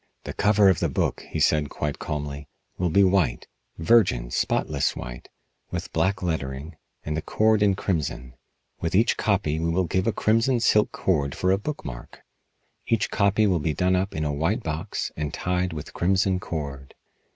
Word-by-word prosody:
"The - - -6
cover 105 -1 +4
of 95 -4 +4
the - - 0
book," - - -1
he - - -3
said 75 -2 +2
quite 75 -1 -3
calmly, 70 -1 -5 0.3
"will 90 -1 +1
be 100 +5 +4
white 90 -10 +2 0.3
virgin, 80 - +3
spotless - - 0
white - - -8 0.4
with - - -5
black 95 0 0
lettering, 75 -2 -3 0.3
and 75 - -2
the 80 - -2
cord 110 +3 +2
in 100 -2 +4
crimson. 75 -10 -3 0.5
With - - -2
each - - +4
copy 75 +1 0
we 85 +1 0
will 90 +2 +1
give 95 +4 -1
a - - +4
crimson 115 +4 +2
silk 105 -2 +3
cord 70 -7 0
for 95 - +1
a 95 - +2
book 150 +7 -5
mark. - - -9 0.6
Each 115 - +1
copy 100 +1 +3
will 90 -4 +2
be 75 0 -1
done 90 +3 +2
up 95 +2 -1
in 75 0 -1
a 75 - -1
white 80 +9 0
box 80 +6 -3
and 75 -1 -3
tied 90 0 -1
with 75 -2 -7
crimson 95 +1 +1
cord." 70 -6 -6
90 Hz, 180 wpm, -25 LUFS, 75-100 Hz, 0.6 s, cover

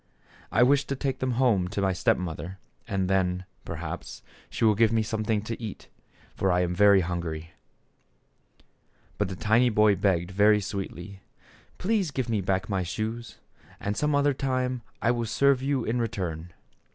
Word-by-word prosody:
I 120 - +4
wish 140 +2 +4
to 140 - -3
take 135 -1 -2
them 130 -1 0
home 115 -7 +2
to 100 +2 -4
my 95 -1 +1
step 90 - +2
mother, 90 +1 -5 0.3
and 95 -1 -1
then, 90 -1 0 0.2
perhaps, - - -6 0.3
she - - -1
will 110 - +6
give 110 +1 +3
me 110 -1 +2
something 110 -1 -1
to 115 +2 -5
eat, 110 -4 -7 0.4
for 95 - 0
I 90 0 +3
am 90 -1 0
very 100 +1 +6
hungry." 85 -2 -4 1.7
But 105 - +1
the 95 - -5
tiny 110 +6 +3
boy 105 -2 +4
begged 95 -2 0
very 105 +2 +4
sweetly: 100 -1 -6 0.3
" - - -28
Please 200 -2 0
give 130 -4 -3
me 110 -3 +1
back 95 0 -1
my 95 -3 -1
shoes, 110 +5 -4 0.4
and 100 +1 -2
some 150 +3 +1
other 145 0 +3
time 130 -2 -1 0.2
I 120 - +4
will 120 -1 -1
serve 140 +3 +3
you 135 -2 0
in 120 +2 0
return." 90 -6 -4
105 Hz, 175 wpm, -27 LUFS, 95-125 Hz, 1.7 s, will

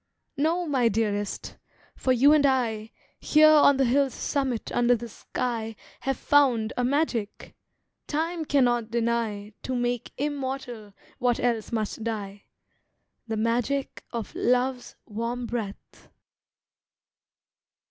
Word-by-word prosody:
No, 325 +5 +1
my 260 -6 +2
dearest! 205 -2 -2 0.4
for 260 - 0
you 265 +4 +6
and 300 -2 +4
I 230 -5 +1 0.3
Here 310 +1 +5
on 290 -2 +6
the 270 - +3
hill's 265 +1 +2
summit 265 -5 -2
under 245 0 +3
the 235 +1 -6
sky 225 0 -4 0.2
Have 270 -2 -2
found 250 -7 +3
a 250 - 0
magic, 250 -6 -1 0.5
time 325 +2 -1
cannot 240 -6 +2
deny 230 -3 -1
To 260 - -3
make 245 -1 -2
immortal 260 -7 -4 0.2
what 245 -2 +1
else 235 -2 0
must 220 -1 -2
die, 205 -3 -5 0.8
The 220 -1 -2
magic 240 +5 -1
of 230 -3 -5
Love's 250 +1 0
warm 235 +3 -3
breath. 225 -4 -6
245 Hz, 115 wpm, -26 LUFS, 225-270 Hz, 0.8 s, you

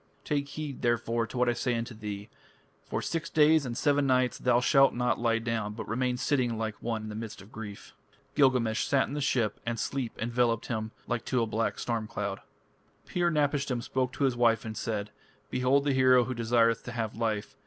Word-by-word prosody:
Take 145 -1 -1
heed, 145 -1 -6
therefore, 120 -1 +1
to 125 - -7
what 125 0 +3
I 120 - +3
say 120 0 -1
unto 115 +1 -3
thee. 105 -2 -6 0.6
For - - -2
six 165 -1 -2
days 155 -2 +4
and 120 -1 -4
seven 145 -1 +2
nights 130 -1 +2
thou 125 -1 +3
shalt 135 +2 +4
not 125 0 +1
lie 115 -1 +2
down, 115 -2 -2
but 115 - -6
remain 125 +2 0
sitting 125 -3 +1
like 110 -1 -2
one 115 -2 -2
in 110 - -6
the - - -6
midst 110 0 -6
of 100 +3 -14
grief." 105 -2 -9 0.4
Gilgamesh 125 -5 +3
sat 140 -1 +2
in - - -7
the 150 - -2
ship, 120 -6 0
and 115 -1 -3
sleep 130 -4 -2
enveloped 115 0 +1
him 110 -2 -2 0.2
like 120 - -2
to 125 -3 +1
a - - +1
black 110 +1 -1
storm 115 -2 -2
cloud. 105 -3 -4 0.6
Pir 175 -1 +1
napishtim 140 -5 0
spoke 130 0 -1
to 140 - -2
his 130 -3 +2
wife 115 -2 +3
and 110 -1 -5
said: 105 -1 -3 0.4
"Behold 130 +2 +3
the 140 -1 +1
hero 130 -1 +5
who 130 +2 -3
desireth 115 -1 +2
to 125 - -6
have 110 -2 -3
life. 110 -2 -2
120 Hz, 205 wpm, -29 LUFS, 115-130 Hz, 0.6 s, hero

